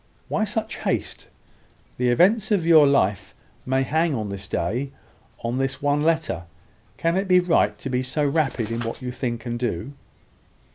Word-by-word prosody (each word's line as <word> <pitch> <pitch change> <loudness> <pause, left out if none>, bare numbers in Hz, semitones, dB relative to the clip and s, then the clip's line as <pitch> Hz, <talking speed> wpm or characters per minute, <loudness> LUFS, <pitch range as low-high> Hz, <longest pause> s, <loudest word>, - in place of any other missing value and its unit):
"Why 215 - +1
such 220 +1 -3
haste? - - -3 0.7
The 125 0 +2
events 195 - +3
of 200 -6 +1
your 160 -3 +7
life 105 -8 +1 0.3
may 130 +1 +2
hang 160 +2 +1
on 110 -3 -3
this 100 0 -6
day, 135 +7 -2 0.5
on 120 +2 -1
this 135 -1 -1
one 145 +1 +1
letter. 155 - 0 0.5
Can 165 +1 +1
it 195 +1 -1
be 180 -1 +6
right 175 -2 +2
to - - -7
be 125 -1 0
so 130 +4 -1
rapid 135 -7 0
in 115 +1 -2
what 115 +2 -4
you 125 - -3
think 120 -2 -4
and 120 0 -3
do?" 120 +2 -3
135 Hz, 175 wpm, -23 LUFS, 120-165 Hz, 0.7 s, your